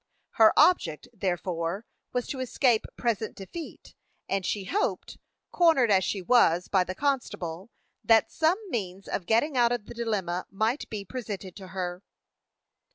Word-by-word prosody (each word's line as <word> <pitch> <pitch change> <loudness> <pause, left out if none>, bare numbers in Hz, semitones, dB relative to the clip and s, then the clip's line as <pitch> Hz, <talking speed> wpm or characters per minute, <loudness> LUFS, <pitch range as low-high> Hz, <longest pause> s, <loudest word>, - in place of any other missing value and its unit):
Her 220 -2 +6
object, 165 - +3
therefore, 180 -1 -2 0.3
was 250 -1 -1
to 270 - -4
escape 250 -2 +1
present 225 -2 -1
defeat, 305 - -9 0.3
and 195 -1 -1
she 200 +2 -2
hoped, 395 - -2 0.3
cornered 320 -10 +4
as 190 -1 +4
she 195 0 -2
was 180 -5 +4
by 190 -2 +3
the 185 +1 -6
constable, 200 - -2 0.3
that 225 -1 +4
some 320 +3 +2
means 195 -4 -4
of 175 - -3
getting 250 +6 +2
out 240 -1 +4
of 240 -4 -2
the - - -9
dilemma 200 -7 -2
might 220 +7 -1
be 205 -2 -5
presented 205 -5 -6
to 190 -2 -9
her. 180 -1 -4
210 Hz, 150 wpm, -27 LUFS, 185-245 Hz, 0.3 s, Her